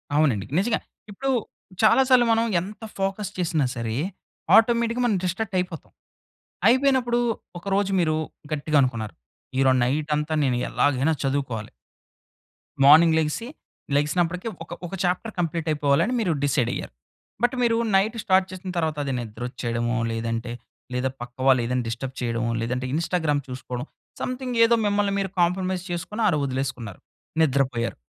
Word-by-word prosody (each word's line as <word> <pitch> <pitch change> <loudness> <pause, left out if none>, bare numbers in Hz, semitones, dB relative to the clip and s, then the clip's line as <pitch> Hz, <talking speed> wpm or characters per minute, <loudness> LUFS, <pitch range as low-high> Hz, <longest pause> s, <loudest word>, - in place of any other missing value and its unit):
అవునండి. 135 -10 +2
నిజంగా. 225 +4 +1 0.3
ఇప్పుడు 270 +7 -3 0.5
చాలా 220 +4 +6
సార్లు 250 -2 +6
మనం 225 +1 +3 0.2
ఎంత 210 +4 -9
ఫోకస్ 195 +1 -2
చేసినా 165 -5 +1
సరే, 115 -2 -3 0.6
ఆటోమేటిక్‌గా 235 +1 +3
మనం 210 -5 +2
డిస్ట్రాక్టయిపోతాం. 185 -3 -2 0.8
అయిపోయినప్పుడు 255 -2 +3 0.4
ఒకరోజు 195 +2 0
మీరు 155 -2 +1 0.4
గట్టిగా 150 0 0
అనుకున్నారు, 115 -5 -2 0.4
ఈరోజు 130 -1 +4
నైటంతా 150 +3 0
నేను 125 -3 +1
ఎలాగైనా 145 +2 +2
చదువుకోవాలి. 135 -6 -2 1.2
మార్నింగ్ 160 +3 +8
లెగిసి 160 +9 -2 0.5
లెగిసినప్పడకి, 170 +7 0 0.2
ఒక - - -9
ఒక 185 - -11
చాప్టర్ 185 +5 -1
కంప్లీటయిపోవాలని 155 - +1
మీరు 185 -7 +1
డిసైడయ్యారు, 125 - 0 0.5
బట్ 245 +2 +3
మీరూ 230 -1 +3 0.2
నైట్ 205 +4 +2
స్టార్ట్ 190 0 +3
చేసిన 185 0 -7
తర్వాతది 150 -4 -1
నిద్రొచ్చెయడమో, 120 +1 -3
లేదంటే 115 +1 -3 0.4
లేదా 125 +1 0
పక్క 120 0 -8
వాళ్ళేదన్నా 125 -1 +2
డిస్టర్బ్ 130 +3 -4
చెయడమో, 115 -1 -1
లేదంటే 125 +2 -2
ఇన్‌స్టాగ్రామ్ 160 -3 0
చూసుకోడం, 125 0 -5 0.4
సమ్‌థింగ్ 255 -1 -3
ఏదో 235 +1 +4
మిమ్మల్ని 205 -1 +1
మీరు 195 -1 -1
కాంప్రమైజ్ 185 +1 0
చేసుకొని 210 +6 -3
ఆడ - - +3
ఒదిలేసుకున్నారు, 130 -6 -4 0.4
నిద్రపొయ్యారు. 130 -5 +1
155 Hz, 120 wpm, -24 LUFS, 130-195 Hz, 1.2 s, మార్నింగ్